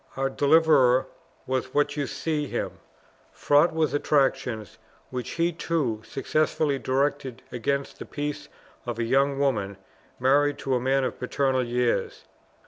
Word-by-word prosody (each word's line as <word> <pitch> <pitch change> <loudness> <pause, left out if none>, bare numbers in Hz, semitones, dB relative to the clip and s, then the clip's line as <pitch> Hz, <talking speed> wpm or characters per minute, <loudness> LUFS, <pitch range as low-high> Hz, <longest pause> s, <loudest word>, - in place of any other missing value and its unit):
Our 135 0 0
deliverer 140 -4 +4 0.4
was 130 0 -3
what 145 0 +2
you 145 -3 -2
see 150 +2 -2
him: - - -4 0.5
fraught 145 +4 +3
with 155 -4 0
attractions, 135 -7 0 0.3
which 125 -1 -4
he 170 +1 0
too 150 -10 -1
successfully 140 +3 0
directed 135 -1 -1
against 140 +3 -2
the - - -6
peace 145 0 -5 0.4
of 120 -2 -3
a 115 - -1
young 135 +4 +2
woman 105 -9 0 0.4
married 145 +3 +3
to 135 - -2
a 125 - +2
man 135 +2 +1
of 130 - -3
paternal 130 0 0
years. 120 0 -1
135 Hz, 135 wpm, -26 LUFS, 125-145 Hz, 0.5 s, deliverer